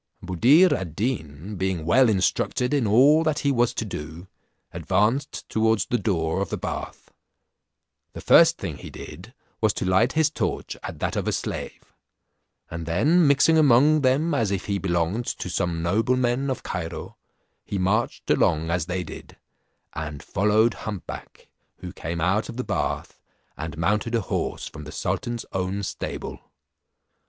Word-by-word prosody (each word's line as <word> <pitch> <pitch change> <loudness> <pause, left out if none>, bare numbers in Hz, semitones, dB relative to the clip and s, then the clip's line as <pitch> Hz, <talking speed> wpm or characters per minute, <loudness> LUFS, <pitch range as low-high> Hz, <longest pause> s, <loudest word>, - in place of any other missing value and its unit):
Buddir 130 - +5
ad 90 -5 -4
Deen, 95 - -3
being 95 -3 -2
well 120 +8 +5
instructed 110 +5 0
in 135 -6 +2
all 135 +9 +6
that 155 -2 0
he 140 - +4
was 120 -2 +2
to 110 - -2
do, 80 -1 -7 0.4
advanced 120 +7 0
towards 110 -2 +1
the 120 - 0
door 90 -4 0
of 100 - -2
the - - -3
bath. - - -6 1.0
The - - -8
first - - +6
thing - - -5
he - - -9
did 110 +8 -11 0.3
was 110 -3 +3
to - - -3
light 95 +6 +3
his 155 -2 +2
torch - - -3
at - - -7
that - - -1
of - - -2
a - - +2
slave; - - -5 0.8
and 85 -1 -6
then 150 - +3
mixing 140 +3 +5
among 145 +2 +5
them 140 +5 +2
as 115 -8 +1
if 100 -1 -2
he 100 -1 -1
belonged 90 +5 -1
to - - -4
some 85 -2 -1
noblemen 120 +7 +1
of 130 - -3
Cairo, 85 -3 -5 0.5
he 100 - -4
marched 100 +5 0
along 80 +2 +2
as 85 -2 -1
they 90 0 -2
did, 80 - -11 0.6
and 75 -2 -6
followed 105 +3 +2
humpback, 105 -4 -8 0.3
who 90 0 -8
came 85 -1 -5
out 95 +6 +1
of 115 - -7
the 125 - -2
bath, - - -3 0.4
and 80 -1 -6
mounted 105 +7 0
a 115 - +1
horse - - -3
from 75 - -10
the 75 - -8
sultan's 120 +7 -3
own 95 +2 -2
stable. - - -5
105 Hz, 160 wpm, -24 LUFS, 90-125 Hz, 1.0 s, all